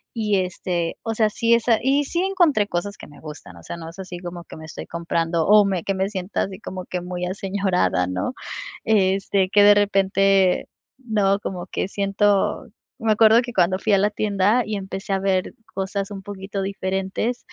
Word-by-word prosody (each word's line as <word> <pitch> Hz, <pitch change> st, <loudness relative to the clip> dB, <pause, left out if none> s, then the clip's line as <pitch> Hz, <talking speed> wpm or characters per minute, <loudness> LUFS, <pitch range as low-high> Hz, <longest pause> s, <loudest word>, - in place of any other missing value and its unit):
y 210 Hz, -3 st, +1 dB
este, 180 Hz, -2 st, -3 dB
o 225 Hz, -1 st, -3 dB
sea, 215 Hz, -1 st, +2 dB
sí 230 Hz, +1 st, +3 dB
es 235 Hz, 0 st, -2 dB
a 225 Hz, -2 st, +4 dB
Y 275 Hz, +3 st, +2 dB
sí 340 Hz, +5 st, -2 dB
encontré 350 Hz, -, +2 dB
cosas 200 Hz, +3 st, -3 dB
que -, -, -11 dB
me 145 Hz, -, -15 dB
gustan, 150 Hz, -, -10 dB
o 85 Hz, -, -14 dB
sea, 170 Hz, -, -7 dB
no 165 Hz, -1 st, -8 dB
es 165 Hz, -, -14 dB
así 185 Hz, -2 st, -7 dB
como 175 Hz, -1 st, -7 dB
que -, -, -12 dB
me 160 Hz, -, -10 dB
estoy 160 Hz, -, -8 dB
comprando 165 Hz, -1 st, -1 dB
o 210 Hz, 0 st, +7 dB
me 190 Hz, -4 st, -1 dB
que 195 Hz, -, -1 dB
me 190 Hz, +1 st, 0 dB
sienta 190 Hz, -1 st, -2 dB
así 190 Hz, -1 st, -6 dB
como 185 Hz, -1 st, -7 dB
que 180 Hz, -, -4 dB
muy 180 Hz, 0 st, -4 dB
aseñorada, 190 Hz, -, 0 dB
¿no?, 90 Hz, -, -3 dB, 0.5 s
este, 195 Hz, -2 st, +2 dB
que 205 Hz, 0 st, +5 dB
de 205 Hz, 0 st, +8 dB
repente, 195 Hz, -2 st, +3 dB, 0.3 s
¿no?, 205 Hz, -5 st, +1 dB
como 180 Hz, -3 st, -5 dB
que 185 Hz, -, -2 dB
siento 200 Hz, 0 st, +1 dB, 0.3 s
Me 225 Hz, -1 st, +1 dB
acuerdo 220 Hz, +2 st, +6 dB
que 245 Hz, -1 st, -7 dB
cuando 185 Hz, 0 st, +2 dB
fui 215 Hz, -, 0 dB
a -, -, +6 dB
la 205 Hz, +2 st, +3 dB
tienda 210 Hz, +3 st, +2 dB
y 215 Hz, -1 st, -3 dB
empecé 195 Hz, +1 st, -5 dB
a 195 Hz, -, +1 dB
ver 190 Hz, -1 st, 0 dB, 0.2 s
cosas 195 Hz, +1 st, -3 dB
un 195 Hz, -1 st, -6 dB
poquito 195 Hz, 0 st, -5 dB
diferentes 195 Hz, +4 st, -2 dB
195 Hz, 200 wpm, -22 LUFS, 185-210 Hz, 0.5 s, de